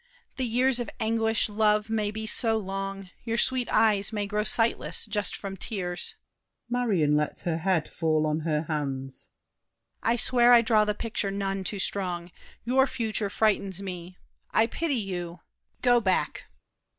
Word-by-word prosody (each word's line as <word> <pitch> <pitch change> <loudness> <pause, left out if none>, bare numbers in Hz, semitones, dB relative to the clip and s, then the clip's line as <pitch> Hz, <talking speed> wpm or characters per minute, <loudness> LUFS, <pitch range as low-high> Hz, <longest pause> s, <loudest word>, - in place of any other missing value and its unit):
The 260 -2 -1
years 250 +2 +2
of 240 - -3
anguish, 225 0 +1
love, 210 0 +1
may 220 -2 -1
be 220 +1 -5
so 225 0 +3
long 195 -1 -5
Your 230 -1 -2
sweet 255 0 +1
eyes 215 -2 +3
may 210 -2 -2
grow 210 +1 -1
sightless, 225 +1 +1
just 210 -2 -2
from 195 -1 -6
tears. 180 -3 -2 0.5
[Marion 210 -12 +1
lets 150 0 -1
her 165 -2 -1
head 170 -2 0
fall 155 -1 0
on 155 0 0
her 155 -1 -1
hands. 135 -4 -5 0.7
DIDIER. 230 - +2
I - - +1
swear 245 +1 +4
I 235 -1 +7
draw 220 -2 +3
the 210 0 -1
picture 225 -2 -2
none 195 -1 -3
too 200 - -2
strong. 180 -3 0 0.3
Your 265 +3 +3
future 220 -4 -2
frightens 200 -3 +1
me. 180 -1 -7 0.3
I 220 - +3
pity 300 +5 -2
you! 180 -6 -4 0.4
Go 245 -1 +5
back! 190 -3 -1
210 Hz, 160 wpm, -27 LUFS, 180-225 Hz, 0.7 s, I